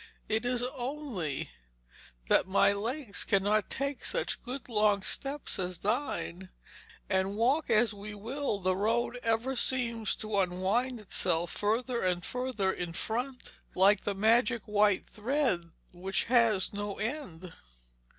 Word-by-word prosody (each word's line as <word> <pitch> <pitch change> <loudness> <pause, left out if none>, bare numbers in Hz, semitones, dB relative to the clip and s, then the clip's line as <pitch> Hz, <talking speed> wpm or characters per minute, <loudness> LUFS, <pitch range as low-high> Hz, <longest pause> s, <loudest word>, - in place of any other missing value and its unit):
'It 220 +1 0
is 245 0 0
only 245 - -4 0.8
that - - +4
my 195 +1 +4
legs 230 +2 -2
cannot 205 +1 +2
take 275 0 -2
such - - -1
good 260 +2 -6
long 210 -4 +2
steps 275 -2 -2
as 180 -1 -2
thine; 190 - -2 0.6
and 190 +1 0
walk 260 +8 +2
as 220 0 +4
we 210 +1 -7
will 235 +3 -2
the 185 -1 +1
road 230 +5 0
ever 230 +3 0
seems 235 -4 +1
to 215 -2 -1
unwind 195 +7 0
itself 170 -4 +1
further 235 +4 0
and 180 -1 0
further 250 -7 -1
in 175 -2 -4
front, 250 +7 -3 0.2
like 195 +2 +5
the 205 - -2
magic 230 +2 +3
white 210 -1 +2
thread 220 - -1 0.2
which 185 +2 -1
has 230 -6 +3
no 205 0 -3
end.' 195 - -5
215 Hz, 130 wpm, -30 LUFS, 195-250 Hz, 0.8 s, like